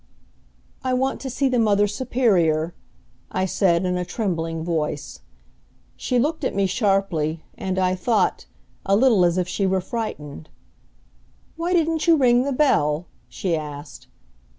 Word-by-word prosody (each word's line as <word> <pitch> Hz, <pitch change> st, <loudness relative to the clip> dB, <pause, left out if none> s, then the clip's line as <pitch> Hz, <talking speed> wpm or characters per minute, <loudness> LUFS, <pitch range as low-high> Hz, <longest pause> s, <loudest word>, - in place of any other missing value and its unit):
"I 255 Hz, -1 st, 0 dB
want 265 Hz, +1 st, -1 dB
to 265 Hz, -, -4 dB
see 270 Hz, +2 st, 0 dB
the 255 Hz, -2 st, +1 dB
Mother 205 Hz, -2 st, +3 dB
Superior," 195 Hz, -8 st, +1 dB, 0.6 s
I 185 Hz, -, 0 dB
said 185 Hz, -1 st, +2 dB
in 180 Hz, 0 st, 0 dB
a 180 Hz, -, -1 dB
trembling 165 Hz, -5 st, -3 dB
voice. 155 Hz, -3 st, -3 dB, 0.8 s
She 250 Hz, -, -1 dB
looked 305 Hz, +5 st, 0 dB
at 260 Hz, -, -1 dB
me 200 Hz, 0 st, +2 dB
sharply, 190 Hz, -7 st, 0 dB
and, 190 Hz, 0 st, -3 dB
I 185 Hz, -1 st, +2 dB
thought, 215 Hz, +5 st, 0 dB, 0.4 s
a 195 Hz, -, +2 dB
little 225 Hz, -4 st, +4 dB
as 175 Hz, 0 st, +2 dB
if 180 Hz, -1 st, 0 dB
she 195 Hz, +1 st, -1 dB
were 190 Hz, 0 st, +1 dB
frightened. 175 Hz, -, -6 dB, 1.1 s
"Why 340 Hz, +2 st, -2 dB
didn't 325 Hz, -1 st, +1 dB
you 335 Hz, -, +7 dB
ring 250 Hz, -2 st, +4 dB
the 280 Hz, -, -1 dB
bell?" 175 Hz, -, +2 dB, 0.2 s
she 180 Hz, -4 st, -2 dB
asked. 150 Hz, -1 st, -8 dB
195 Hz, 150 wpm, -23 LUFS, 170-250 Hz, 1.1 s, you